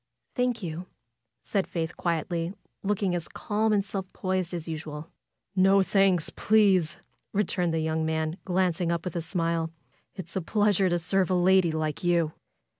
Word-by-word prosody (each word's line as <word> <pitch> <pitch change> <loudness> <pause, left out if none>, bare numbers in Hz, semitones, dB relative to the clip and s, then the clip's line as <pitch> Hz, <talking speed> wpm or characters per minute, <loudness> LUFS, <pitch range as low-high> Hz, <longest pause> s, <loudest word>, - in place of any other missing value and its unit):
Thank 245 -3 0
you," 170 +1 -5 0.6
said 195 -3 -1
Faith, 165 -1 -3
quietly, 170 +1 -1 0.3
looking 200 -2 0
as 175 -2 -2
calm 215 +1 -1
and 200 -2 +2
self 195 -2 -5
possessed 185 -2 -1
as 170 -2 -5
usual, 155 -1 -6 0.4
^^No 195 +1 +5
thanks, 195 -5 +3
please!" 195 -7 +3 0.4
returned 180 -4 +1
the 160 0 0
young 160 0 0
man, 160 +1 -1
glancing 180 -2 +1
up 170 0 -2
with 180 - -4
a 170 - 0
smile. 165 -1 -1 0.5
"It's 170 -4 -8
a 190 - 0
pleasure 205 0 +2
to 175 - +2
serve 185 +2 +1
a 185 - +2
lady 180 -1 +4
like 155 0 -2
you." 170 -3 +2
175 Hz, 160 wpm, -27 LUFS, 165-195 Hz, 0.6 s, ^^No